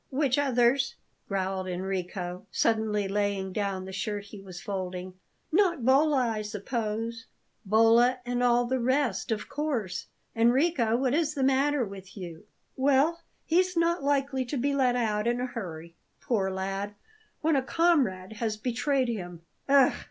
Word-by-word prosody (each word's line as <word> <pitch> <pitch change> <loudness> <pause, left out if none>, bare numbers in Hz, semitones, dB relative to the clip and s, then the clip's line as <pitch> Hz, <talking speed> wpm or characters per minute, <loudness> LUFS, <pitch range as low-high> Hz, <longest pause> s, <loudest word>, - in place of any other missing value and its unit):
"Which 275 -1 +1
others?" 265 -1 +2 0.3
growled 190 -1 -2
Enrico, 180 0 -4
suddenly 215 -2 +1
laying 200 -1 -1
down 195 -2 -2
the 190 - -7
shirt 205 +2 -3
he 200 0 -11
was 185 -2 -9
folding. 185 -2 -5 0.4
"Not 345 - +2
Bolla, 270 -1 +4
I 220 -2 -2
suppose?" 225 +2 -4 0.4
"Bolla 230 +4 +5
and 245 0 -1
all 245 0 +3
the 260 +2 0
rest, 245 -6 0
of 215 -1 -2
course. 245 - -3 0.3
Enrico, 235 0 +3
what 260 0 +1
is 305 0 +1
the 275 - 0
matter 270 0 +2
with 195 0 -11
you?" 175 0 -8 0.3
"Well, 285 +5 +2 0.2
he's 360 +2 +2
not 335 -1 +2
likely 275 -2 +1
to 275 +4 -3
be 280 +3 0
let 255 -3 +2
out 215 -2 0
in 240 +1 +1
a 250 - -1
hurry, 170 -9 -7 0.3
poor 200 -6 0
lad, 195 +2 -3 0.5
when 320 -1 +2
a 270 - +3
comrade 260 - +1
has 220 -2 -2
betrayed 255 +4 0
him. 175 -7 -5 0.3
Ugh!" 275 -2 +6
230 Hz, 150 wpm, -28 LUFS, 195-270 Hz, 0.5 s, Ugh